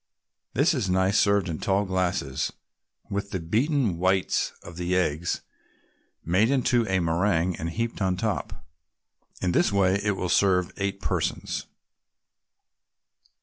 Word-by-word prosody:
This 145 +7 +4
is 120 -10 -1
nice 95 +2 +3
served 100 -2 +3
in 80 -2 -4
tall 100 +1 +1
glasses, 90 -6 -1 0.6
with 100 0 -2
the 95 - -3
beaten 110 - 0
whites 95 +1 +1
of 85 - -10
the 90 +1 -1
eggs 85 -2 0 0.8
made 95 +7 +3
into 125 -4 +2
a 95 - +1
meringue 85 +1 +1
and 80 +1 -3
heaped 115 +5 -3
on 95 -1 +1
top. 105 -8 -3 0.8
In 90 - +2
this 85 - +3
way 100 0 +2
it 105 -2 0
will 90 - -2
serve 90 0 +2
eight 100 0 -2
persons. - - -2
95 Hz, 135 wpm, -26 LUFS, 90-100 Hz, 0.8 s, This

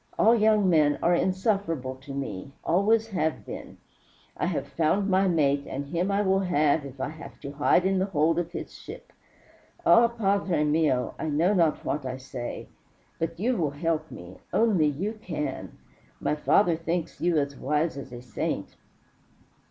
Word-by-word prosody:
All 225 - +5
young 215 -3 +4
men 155 -4 +4
are 175 - +4
insufferable 185 - 0
to 135 +1 -11
me 135 -4 -5
always 215 +6 +2
have 160 -6 -1
been. - - -8 0.6
I - - -1
have - - -2
found 170 +5 +1
my 190 0 +3
mate, 145 -5 +1
and 140 +2 -4
have 140 - -12
him 175 +3 0
I 200 +1 +1
will 190 0 +2
if 145 -6 +1
I 130 - -2
have 160 +1 -11
to 140 - -6
hide 150 +5 +2
in 190 0 +2
the 190 - 0
hold 165 -2 +2
of 175 - -3
his - - -6
ship. - - -11 0.7
Ah, 235 +1 +7
padre 200 -7 0
mio, 150 -4 +1
I 160 - -2
know 165 +7 +2
not 165 -5 +1
what 150 - -1
I 130 0 -4
say. 130 -2 -6 0.5
But 165 0 -3
you 245 +5 +1
will 160 -7 0
help 160 +2 -2
me. 90 +1 -10
Only 205 -9 +3
you 195 +10 -3
can. 150 -8 -5 0.4
My - - 0
father 170 +3 +3
thinks 165 +1 -3
you 175 -2 +2
as 140 -1 -1
wise 150 +4 0
as 135 -2 -8
a 120 0 -9
saint. 120 -4 -4
165 Hz, 175 wpm, -27 LUFS, 145-190 Hz, 0.7 s, Ah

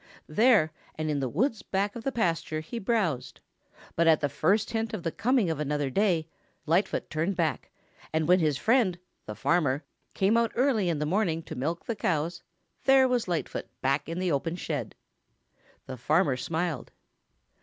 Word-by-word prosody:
There 210 -2 +4 0.2
and 155 -1 -2
in 145 - 0
the 130 -2 -1
woods 225 - 0
back 200 +1 -1
of 235 - -7
the 270 - -1
pasture 165 -8 -1
he 230 +9 -6
browsed, 195 - -1 0.6
but 170 0 +3
at 160 -2 +6
the 145 - 0
first 195 - +1
hint 225 -1 -2
of 180 - -7
the 165 - -1
coming 235 -4 +1
of 155 - -3
another 145 -2 -1
day, 175 -3 +1 0.4
Lightfoot 175 +5 +1
turned 165 +5 -1
back, 165 -3 -1 0.4
and 160 -1 0
when 180 +1 +5
his 155 -4 +1
friend, 220 - +2 0.3
the 105 - -5
farmer, 145 -3 +1 0.3
came 200 +4 +3
out 230 -1 +1
early 235 -7 +2
in 165 - 0
the 150 - -1
morning 165 -1 0
to - - -8
milk 160 +7 -3
the 230 - -2
cows, 170 -3 -1 0.4
there 265 -1 +6
was 245 -4 0
Lightfoot 170 -3 -3 0.2
back 140 +3 +1
in 165 - -4
the 180 -1 0
open 160 +4 -1
shed. 180 - -4 0.9
The 130 -1 -7
farmer 150 +3 +2
smiled. 160 +1 -3
170 Hz, 175 wpm, -28 LUFS, 155-210 Hz, 0.9 s, at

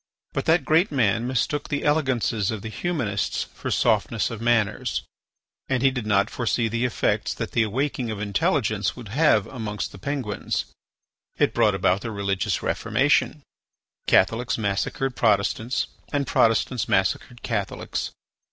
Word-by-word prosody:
But - - -2
that 160 -3 +3
great 165 +7 +3
man 115 -3 +1
mistook 130 +3 -1
the 145 - -1
elegances 130 -8 +1
of 110 -3 -4
the 110 - -5
humanists 125 - -1
for - - -5
softness 110 -4 +1
of 115 -1 -6
manners, 115 -3 +1 0.7
and 130 -1 +1
he 135 - +5
did 125 -4 -4
not 100 -2 +2
foresee 120 -1 0
the 115 +2 -1
effects 125 - 0
that - - -4
the 120 - +2
awaking 125 +2 -1
of 110 -2 -4
intelligence 105 - 0
would 120 -5 -9
have 115 -5 +3
amongst 105 -7 -4
the 95 - -12
Penguins. 125 -4 -2 0.7
It - - +2
brought - - +3
about 95 +2 +2
the 115 - -4
religious 100 -3 -1
Reformation; - - +1 0.6
Catholics 115 +6 +3
massacred 110 +5 -1
Protestants 110 +3 +1 0.3
and 140 -1 0
Protestants 115 -1 +2
massacred 95 +5 0
Catholics. 105 -4 -3
115 Hz, 145 wpm, -24 LUFS, 105-130 Hz, 0.7 s, he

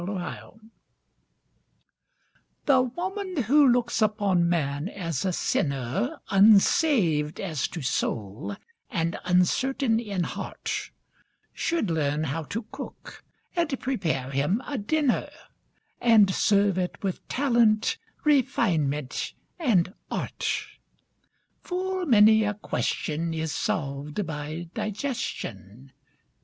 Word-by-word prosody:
THE 195 +3 -3
CUSINE 175 - -8 1.9
The 265 -3 +5
woman 360 - -3
who 285 +5 +5
looks 240 -2 +2
upon 200 -5 +2
man 150 0 -1
as 165 -9 -3
a 190 - +1
sinner 165 - -1
Unsaved 195 - +4
as 165 -8 -2
to 165 - -7
soul, 115 - -2 0.3
and 170 -7 -1
uncertain 225 +7 +2
in 200 -6 -2
heart, - - -4 0.6
Should 330 - -1
learn 150 -1 0
how 160 +2 -2
to 225 +7 -4
cook, 275 0 -9 0.3
and 330 -6 0
prepare 160 - -2
him 150 - 0
a 280 -4 -3
dinner, 275 +5 +1 0.7
And 215 -5 +5
serve 200 -2 +3
it 180 +2 -3
with 190 -2 -3
talent, 235 -5 +2 0.2
refinement, 175 - +1 0.3
and 200 - +2 0.2
art. - - -2 1.0
Full 370 0 -2
many 220 -2 +6
a 210 0 -1
question 165 -5 -2
is 160 -1 -2
solved 145 +7 -2
by 155 +2 -5
digestion. 140 - -5
200 Hz, 100 wpm, -26 LUFS, 155-245 Hz, 1.9 s, many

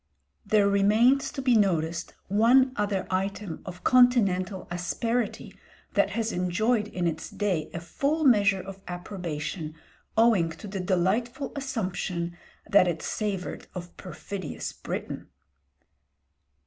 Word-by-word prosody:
There 205 -1 +3
remains 215 +7 +4
to 270 -3 -5
be 250 -2 +4
noticed 170 -5 +1
one 240 +6 +5
other 205 -2 -1
item 195 -1 -2
of 180 0 -8
continental 200 -7 +3
asperity 225 +6 -2 0.4
that - - +3
has 225 -1 0
enjoyed 210 +5 +1
in 180 -4 -3
its 165 -2 -2
day 185 -7 -1
a 170 - -4
full 280 - -1
measure 200 -7 +4
of 195 0 -9
approbation 175 -3 -5 0.4
owing 220 -7 +4
to 165 - -11
the 195 0 -4
delightful 210 +9 0
assumption 185 -10 -3 0.3
that 195 -2 +5
it 165 -2 -2
savoured 200 -4 -3
of 175 -1 -7
perfidious 185 -1 -6
Britain. - - -6
195 Hz, 120 wpm, -27 LUFS, 180-230 Hz, 0.4 s, one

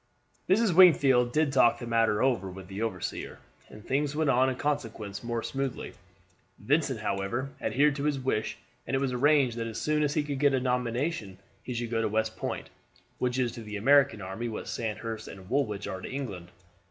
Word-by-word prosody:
Mrs. 205 0 +4
Wingfield 140 -9 +6
did 155 0 +1
talk 120 -3 +5
the 120 - -7
matter 115 -2 +2
over 120 -8 +1
with 95 0 -10
the 100 +2 -5
overseer, 105 -6 -4 0.3
and 105 +1 -13
things 140 +2 0
went 155 -2 +2
on 130 +1 +3
in 130 - -2
consequence 115 -8 -3
more 115 -1 -2
smoothly. 135 -2 -4 0.6
Vincent, 135 0 0
however, 110 +7 -2
adhered 145 +1 +2
to 140 - -2
his 150 -2 +1
wish, 130 -4 -1 0.3
and - - 0
it - - +2
was 135 -2 -1
arranged 135 -2 +3
that 115 0 -2
as 115 0 -5
soon 150 0 +1
as 150 -1 0
he 155 - +2
could 145 -2 -4
get 140 -1 +4
a - - +2
nomination 125 - -1 0.2
he 125 - -6
should 120 -1 -3
go 115 -1 +1
to 110 - +1
West 110 +1 0
Point, - - -5 0.5
which 125 0 0
is 125 -2 +1
to 115 - -8
the 105 -1 -6
American 135 -2 +4
army 95 +6 -4
what 110 - -6
Sandhurst 110 0 -4
and 95 -1 -11
Woolwich 110 -7 0
are 95 - -5
to - - -6
England. 110 -11 -5
125 Hz, 200 wpm, -28 LUFS, 110-140 Hz, 0.6 s, Wingfield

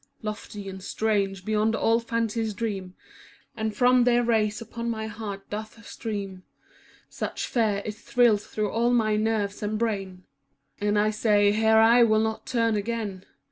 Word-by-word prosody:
Lofty 210 -1 -6
and 190 0 -7
strange 195 -3 -1
beyond 215 +1 +1
all 225 +1 +2
fancy's 230 -2 -2
dream. 195 -5 -4 0.6
And 220 -1 -3
from 250 0 +4
their 240 0 +3
rays 220 -3 +1
upon 235 +1 -5
my 220 -1 -3
heart 210 -2 -7
doth 215 +2 -7
stream 200 -4 -5 0.3
* - - -28 0.3
Such - - -4
fear, 210 -4 0
it 215 - -3
thrills 220 -1 +2
through 215 -1 -2
all 235 +1 +1
my 220 -3 +2
nerves 215 -2 -1
and 210 +1 -2
brain, 195 -5 -3 0.6
And 205 0 +1
I 210 +1 +3
say, 210 -1 +3
"Here 220 +1 +3
I 230 +2 +6
will 215 -2 +4
not 220 0 -2
turn 230 -3 +1
again." 205 -3 -3
215 Hz, 160 wpm, -26 LUFS, 205-230 Hz, 0.6 s, I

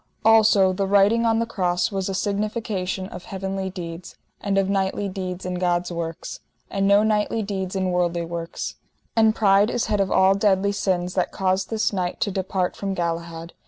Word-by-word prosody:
Also, 215 -4 +5
the 195 +1 -1
writing 205 +4 +4
on 225 0 +3
the 230 - +1
cross 180 -5 0
was 195 -1 -2
a 195 - -2
signification 205 -2 -2
of 180 - -9
heavenly 190 0 -4
deeds, 175 -2 -8 0.2
and 200 -1 -1
of 195 -1 +2
knightly 195 +1 0
deeds 185 -1 -5
in 180 - -3
God's 175 0 0
works, 165 -1 -5 0.3
and 195 0 +1
no 200 +1 +5
knightly 215 +1 +1
deeds 190 -2 -4
in 190 -1 0
worldly 175 -1 0
works. 165 0 -5 0.4
And 220 -1 +4
pride 200 0 +4
is 245 - -1
head 210 - 0
of 195 - 0
all 190 +1 +4
deadly 200 0 +2
sins, 180 -3 -1
that 180 -1 0
caused 190 0 0
this 220 -1 0
knight 180 -2 -2
to 205 - +1
depart 185 -1 -2
from 195 -1 -3
Galahad. 170 -1 -4
190 Hz, 185 wpm, -23 LUFS, 180-205 Hz, 0.4 s, Also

